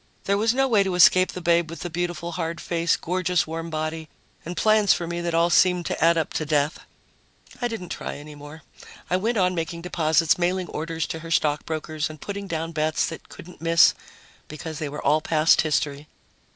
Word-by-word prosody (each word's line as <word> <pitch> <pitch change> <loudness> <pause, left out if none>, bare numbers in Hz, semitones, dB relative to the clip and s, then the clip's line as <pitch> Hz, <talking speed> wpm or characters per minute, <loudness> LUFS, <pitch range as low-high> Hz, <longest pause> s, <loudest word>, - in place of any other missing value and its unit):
There 200 - +1
was 220 +1 +3
no 270 +2 +2
way 220 -5 +4
to 190 -2 -1
escape 185 +1 +5
the 180 - -6
babe 170 -1 +2
with 165 -2 -8
the 175 - -4
beautiful 175 0 -3
hard 165 0 -4
face, 170 -1 0
gorgeous 180 0 0
warm 165 +1 -5
body 155 0 -4 0.3
and 175 +2 -7
plans 215 -2 +4
for 170 - -4
me 170 +1 -4
that 170 -1 -2
all 170 +1 +3
seemed 180 -1 +3
to - - -2
add 165 0 +5
up 160 - -1
to - - -1
death. 150 0 0 0.8
I 245 - +1
didn't 220 -7 -6
try - - -5
any 150 +1 -10
more. 145 +1 -12 0.5
I 180 - +3
went 225 +5 -1
on 185 -1 +2
making 170 0 -4
deposits, 165 -1 +2
mailing 180 0 0
orders 160 +1 -3
to 160 - -5
her 165 +1 -9
stock 150 -2 +1
brokers, 155 -1 -3
and 155 -1 -10
putting 200 +3 -6
down 165 -1 -3
bets 155 -1 0
that 160 - -10
couldn't 180 0 -13
miss 165 0 +5 0.5
because 155 +1 -7
they 155 -3 -3
were 150 +1 -7
all 155 +1 +3
past 155 0 +3
history. 150 -1 -1
165 Hz, 205 wpm, -24 LUFS, 155-180 Hz, 0.8 s, escape